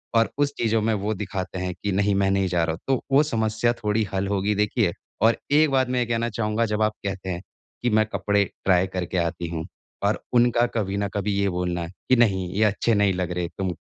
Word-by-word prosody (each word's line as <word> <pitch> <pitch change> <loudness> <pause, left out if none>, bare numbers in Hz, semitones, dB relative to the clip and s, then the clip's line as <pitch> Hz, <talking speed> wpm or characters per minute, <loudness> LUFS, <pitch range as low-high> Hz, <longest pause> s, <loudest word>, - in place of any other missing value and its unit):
और 115 0 +4
उस 145 0 +1
चीज़ो 110 -1 +1
में 110 +1 +1
वो 105 +1 -1
दिखाते 95 -2 -4
हैं 90 -1 -2
कि 100 - 0
नहीं, 100 +1 +2
मैं 100 0 +2
नहीं 95 -1 +2
जा 85 -2 +1
रहा 80 - 0
हूँ 80 - -8
तो 135 -2 +1
वो 140 +3 +6
समस्या 110 -3 0
थोड़ी 105 -1 0
हल 95 0 0
होगी। 100 +1 0
देखिए, 105 0 +1 0.3
और 115 +1 +4
एक 155 +1 +5
बात 130 -2 +2
मैं 125 -1 +1
ये 120 - +1
कहना 115 0 -1
चाहूँगा 110 +1 0
जब 105 0 -1
आप 110 0 +2
कहते 95 -1 -4
हैं 90 0 -3 0.4
कि 120 - +2
मैं 110 0 +3
कपड़े 105 -1 +2 0.2
ट्राई 95 -1 +4
करके 90 0 -2
आती 85 0 -1
हूँ, 80 -1 -4 0.4
और 100 +2 0
उनका 120 0 +4
कभी 100 -2 -1
न 100 0 0
कभी 100 0 -1
ये 100 - +2
बोलना 90 -1 -2
कि 110 +8 0
नहीं, 95 -6 +2
ये 105 +3 +2
अच्छे 105 +2 +2
नहीं 100 -2 +3
लग 90 -1 -2
रहे 90 -1 -2
तुम 95 -2 -1
105 Hz, 235 wpm, -24 LUFS, 95-115 Hz, 0.4 s, वो